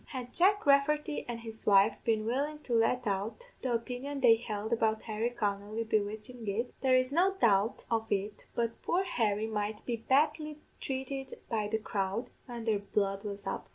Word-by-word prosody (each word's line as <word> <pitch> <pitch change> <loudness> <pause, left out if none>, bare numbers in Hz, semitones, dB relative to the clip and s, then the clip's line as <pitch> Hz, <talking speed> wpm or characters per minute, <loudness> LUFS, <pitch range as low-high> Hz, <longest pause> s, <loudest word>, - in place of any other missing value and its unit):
Had 250 -2 -6
Jack 405 +4 +4
Rafferty 295 +2 +3
an' 240 - -2
his 225 -1 -6
wife 200 +1 +6
been 220 -2 +1
willin' 280 +6 -1
to 245 - -3
let 235 +2 +2
out 215 - -3
the 255 - -1
opinion 250 +4 -3
they 245 -4 +7
held 220 -1 -3
about 220 -1 +1
Harry 220 +1 -1
Connolly 210 -1 -2
bewitchin' 220 +2 -2
it, 225 +5 -1
there 260 -1 +4
is 255 +1 +2
no 370 +6 +3
doubt 215 - +2
of 225 -1 0
it 205 +1 -2
but 230 -1 -1
poor 365 +3 +1
Harry 220 - 0
might 210 -1 -3
be 235 -2 -1
badly 300 +5 +1 0.2
trated 270 0 -4
by 215 -3 0
the 220 +1 0
crowd, 200 +1 -2 0.2
when 240 -2 -6
their 215 -3 +2
blood 200 -1 -1
was 200 -1 -6
up. 195 - -4
230 Hz, 180 wpm, -31 LUFS, 210-265 Hz, 0.2 s, they